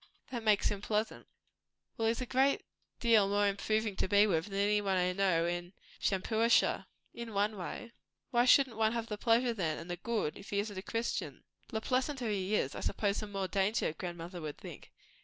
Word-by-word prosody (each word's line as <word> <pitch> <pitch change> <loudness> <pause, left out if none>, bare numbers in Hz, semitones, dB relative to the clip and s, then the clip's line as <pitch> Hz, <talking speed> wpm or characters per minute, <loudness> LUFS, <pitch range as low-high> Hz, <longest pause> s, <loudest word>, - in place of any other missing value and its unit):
That 240 -2 -3
makes 215 -2 +3
him 205 -1 -4
pleasant." 215 +1 -2 0.7
"Well, 225 - 0
he's 230 +2 0
a - - -2
great 265 +3 +2 0.3
deal 225 -4 +4
more 205 0 +2
improving 215 +1 0
to - - 0
be 205 +2 +5
with 165 -4 0
than 195 -1 -5
anybody 200 -3 +2
I - - -4
know 180 -3 +2
in 175 +1 -3 0.3
Shampuashuh." 220 +4 +2 0.3
"In 235 -3 -7
one 205 +2 +1
way." 190 +4 -6 0.4
"Why 240 0 +4
shouldn't 255 -2 +5
one 220 0 +2
have 230 -1 -2
the 210 -1 -4
pleasure, 235 +1 +3
then, 165 -8 -1
and 170 +2 -7
the 175 - -3
good, 210 -5 -2
if 200 - -12
he 200 - -2
isn't 205 0 -2
a - - -5
Christian?" 230 +3 -3 0.2
"The 220 - -3
pleasanter 255 0 -1
he 200 +1 0
is, 140 -8 0
I - - -6
suppose 200 -1 -1
the 215 - -4
more 195 -2 -3
danger, 195 -3 0
grandmother 175 +1 -6
would 150 -2 -5
think." - - -11
205 Hz, 195 wpm, -32 LUFS, 190-225 Hz, 0.7 s, be